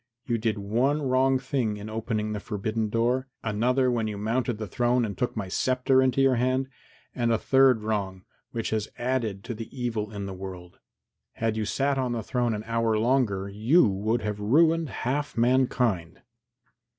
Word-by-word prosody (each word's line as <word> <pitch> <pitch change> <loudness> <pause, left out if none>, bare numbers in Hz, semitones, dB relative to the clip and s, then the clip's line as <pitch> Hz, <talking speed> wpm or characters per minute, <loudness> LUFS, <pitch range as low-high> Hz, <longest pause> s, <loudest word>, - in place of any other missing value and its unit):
You 115 -1 0
did 110 -1 0
one 125 +9 0
wrong 130 0 +3
thing 125 -5 -1
in 105 +1 -7
opening 110 -1 -2
the 105 - -3
forbidden 110 +1 -2
door, 120 +4 +1 0.2
another 125 +4 +1
when 115 -2 0
you 105 -1 -4
mounted 115 +3 -1
the 110 - -4
throne 120 +4 +1
and 100 -3 -5
took 120 +3 -2
my 100 -3 -3
sceptre 130 +6 +2
into 130 +1 +2
your 130 -2 +4
hand, 130 +2 0 0.4
and 120 -2 0
a 115 - +3
third 130 -3 +4
wrong, 100 -4 -2 0.3
which 115 -2 -3
has 110 -1 -1
added 120 -6 -2
to 120 - -5
the 110 0 -7
evil 110 -4 -2
in 100 -2 -5
the 95 - -5
world. 90 -2 -9 0.5
Had 115 -1 -1
you 110 -1 -1
sat 135 +5 0
on 125 -2 -1
the 115 -2 -3
throne 120 0 0
an 105 - -5
hour 115 -1 0
longer, 110 -5 +1
you 110 - +3
would 105 +4 -1
have 105 -1 -3
ruined 160 +8 +3
half 145 +5 -3
mankind." 120 -8 +1
115 Hz, 180 wpm, -26 LUFS, 105-130 Hz, 0.5 s, your